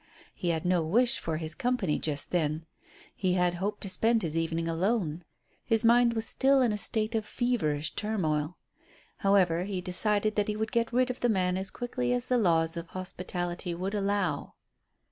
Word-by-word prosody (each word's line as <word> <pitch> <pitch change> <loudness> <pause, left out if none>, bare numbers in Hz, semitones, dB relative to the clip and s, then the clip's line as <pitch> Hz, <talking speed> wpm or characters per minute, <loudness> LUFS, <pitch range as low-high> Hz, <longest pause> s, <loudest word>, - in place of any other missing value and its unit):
He 175 - -2
had 165 -1 -1
no 180 -1 +2
wish 235 +10 +2
for 160 -1 -3
his 160 0 -2
company 205 -3 0
just 145 -2 -1
then. 160 -2 0 0.5
He 185 -2 0
had 180 -1 +2
hoped 205 +2 -2
to - - -4
spend 225 +5 +2
this 160 -4 -2
evening 165 0 -1
alone. 175 -1 -1 0.4
His 225 -1 +2
mind 235 0 +5
was 225 -1 -2
still 275 0 +3
in 240 - +2
a 210 - -1
state 215 +2 +1
of 220 -1 0
feverish 190 - -1
turmoil. 165 -7 -1 0.6
However, 185 -3 +2
he 195 -2 -3
decided 205 +4 +1
that 205 - +2
he 210 - -1
would 220 +1 -3
get 230 -1 0
rid 250 +1 +2
of 250 - -8
the 245 - +1
man 185 -4 +1
as 190 +1 -3
quickly 125 - -2
as 125 - -1
the 250 -1 +3
laws 165 -5 +2
of 170 0 -5
hospitality 180 -1 -4
would 190 +4 -3
allow. 200 -6 -1
185 Hz, 185 wpm, -29 LUFS, 165-220 Hz, 0.6 s, mind